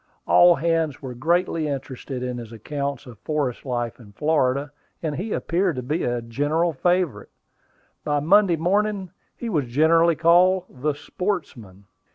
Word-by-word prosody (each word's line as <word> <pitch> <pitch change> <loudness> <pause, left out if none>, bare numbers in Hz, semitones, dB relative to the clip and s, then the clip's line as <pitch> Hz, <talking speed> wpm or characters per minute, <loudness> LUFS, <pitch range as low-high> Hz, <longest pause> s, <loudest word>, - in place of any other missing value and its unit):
All 175 0 +6
hands 165 -4 -1
were 130 -2 -5
greatly 165 +4 0
interested 135 -2 -5
in 125 -1 -3
his 115 -2 -9
accounts 140 +4 -4
of 120 -5 -12
forest 145 -4 -3
life 120 -2 -3
in 105 -4 -15
Florida, 145 +1 0 0.3
and 155 -2 -2
he 205 +7 -4
appeared 180 -2 0
to 125 - -4
be 150 +7 -1
a 120 -1 -1
general 145 +8 0
favorite. 175 - 0 0.7
By 145 -1 0
Monday 185 +4 +4
morning, 195 +2 0 0.3
he 240 - -5
was 150 - 0
generally 165 +6 +4
called 175 +3 +4
the 145 +3 -2
"sportsman." 140 - -5
150 Hz, 150 wpm, -23 LUFS, 125-175 Hz, 0.7 s, All